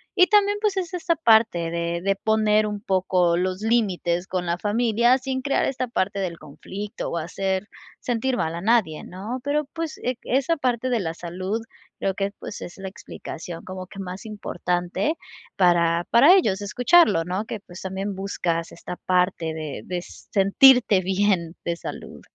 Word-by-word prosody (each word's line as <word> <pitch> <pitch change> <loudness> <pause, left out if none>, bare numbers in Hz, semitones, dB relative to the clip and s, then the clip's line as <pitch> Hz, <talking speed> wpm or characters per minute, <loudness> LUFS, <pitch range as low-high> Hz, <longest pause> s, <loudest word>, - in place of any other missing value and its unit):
Y 365 -2 +6
también, 410 0 +4
pues, 420 -2 +1
es 365 -2 -2
esta 355 -1 0
parte 220 - +3
de 170 0 -2
de 195 0 +2
poner 215 +1 +2
un 210 -1 -4
poco 185 -4 +2
los 185 +2 -1
límites 190 -6 0
con 180 -2 -2
la 170 0 -1
familia 235 +3 +3
sin 260 0 -3
crear 275 +2 +1
esta 255 -1 -2
parte 200 -3 -1
del 175 -4 -3
conflicto 195 +7 -7
o - - -3
hacer 190 +4 -2 0.3
sentir 245 +1 -1
mal 160 - -1
a 170 - -5
nadie, 210 -8 +2
¿no?, 210 +8 -6
pero 295 +1 0
pues 330 -1 -4
e 250 0 -1
esa 275 +6 +1
parte 255 -2 0
de 240 -3 +1
la 165 -4 -3
salud, 185 +6 -4 0.4
creo 195 - 0
que, 195 0 -1
pues, - - -8
es 175 - -8
la 190 0 -6
explicación 170 -2 -8
como 185 -1 -7
que 195 - -13
más 185 +2 -6
importante 180 - -2 0.4
para 170 -2 +3
para 295 +11 +8
ellos 205 - +2
escucharlo, 240 - +4
¿no?, 185 +5 -3
que, 220 -1 -5
pues, 180 -1 -12
también 190 +1 -3
buscas 175 -4 -2
esta 175 +1 -8
parte 180 -3 0
de 155 -7 -5
de 180 -1 -3
sentirte 205 +3 +4
bien 185 -3 0
de 170 - 0
salud. - - -8
195 Hz, 170 wpm, -24 LUFS, 175-240 Hz, 0.4 s, para